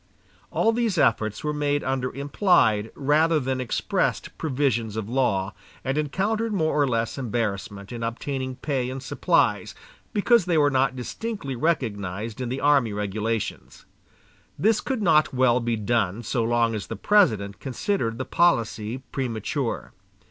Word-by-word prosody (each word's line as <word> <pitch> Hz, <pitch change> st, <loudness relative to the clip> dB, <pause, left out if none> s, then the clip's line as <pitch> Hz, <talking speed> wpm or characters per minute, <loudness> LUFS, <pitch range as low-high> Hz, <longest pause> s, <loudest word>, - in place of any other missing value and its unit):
All 225 Hz, -, +2 dB
these 225 Hz, -5 st, 0 dB
efforts 110 Hz, -7 st, +1 dB
were 150 Hz, 0 st, -1 dB
made 145 Hz, -1 st, 0 dB
under 130 Hz, -1 st, -1 dB
implied, 140 Hz, -, +2 dB
rather 155 Hz, +3 st, +3 dB
than 130 Hz, -1 st, -2 dB
expressed 125 Hz, -, -1 dB
provisions 130 Hz, -7 st, -1 dB
of 110 Hz, -2 st, -3 dB
law, 105 Hz, -6 st, 0 dB, 0.3 s
and 135 Hz, +1 st, 0 dB
encountered 200 Hz, +10 st, 0 dB
more 160 Hz, -6 st, +1 dB
or 145 Hz, -2 st, +3 dB
less 115 Hz, +1 st, -1 dB
embarrassment 105 Hz, -4 st, -3 dB
in 120 Hz, -1 st, -6 dB
obtaining 130 Hz, +3 st, -3 dB
pay 130 Hz, -3 st, -2 dB
and 130 Hz, +1 st, -6 dB
supplies, 130 Hz, -, +1 dB, 0.4 s
because 215 Hz, -1 st, +3 dB
they 170 Hz, -3 st, +1 dB
were 145 Hz, -1 st, +4 dB
not 130 Hz, 0 st, +2 dB
distinctly 140 Hz, -, -5 dB
recognized 110 Hz, -, -2 dB
in 125 Hz, -, -2 dB
the 130 Hz, +2 st, -3 dB
army 140 Hz, -6 st, +3 dB
regulations. 105 Hz, +2 st, -3 dB, 0.7 s
This 215 Hz, +2 st, +2 dB
could 260 Hz, -6 st, -2 dB
not 155 Hz, -6 st, +3 dB
well 125 Hz, -1 st, +4 dB
be 120 Hz, -1 st, -1 dB
done 110 Hz, -1 st, 0 dB
so 115 Hz, +1 st, -1 dB
long 115 Hz, 0 st, +2 dB
as 110 Hz, -, -4 dB
the -, -, -5 dB
President 105 Hz, -, +2 dB
considered 130 Hz, -, -2 dB
the 130 Hz, -, -3 dB
policy 115 Hz, -7 st, +1 dB
premature. 125 Hz, 0 st, -3 dB
130 Hz, 145 wpm, -25 LUFS, 115-150 Hz, 0.7 s, were